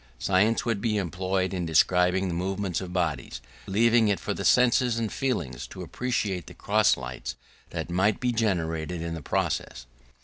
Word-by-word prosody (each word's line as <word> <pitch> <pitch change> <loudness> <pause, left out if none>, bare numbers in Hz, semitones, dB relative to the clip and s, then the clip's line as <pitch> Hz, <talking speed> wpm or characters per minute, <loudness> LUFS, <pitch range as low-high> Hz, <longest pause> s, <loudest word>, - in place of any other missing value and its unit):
Science 100 - +2
would 115 -4 -1
be 110 -3 0
employed 95 0 -1
in 90 -2 -2
describing 90 +3 +3
the 90 - -2
movements 95 0 -2
of 90 -2 -6
bodies, 75 -9 -2 0.3
leaving 115 +3 +4
it 100 -2 +1
for - - -3
the - - -5
senses 125 +4 +4
and 115 -2 -2
feelings 75 - -2
to - - -8
appreciate 100 - -2
the - - -11
cross - - +3
lights 60 -1 -6 0.3
that - - -5
might 95 +4 +2
be 125 -1 +1
generated 85 -7 -1
in 85 0 -3
the 80 - -5
process. 60 -2 -2
95 Hz, 170 wpm, -27 LUFS, 85-110 Hz, 0.3 s, leaving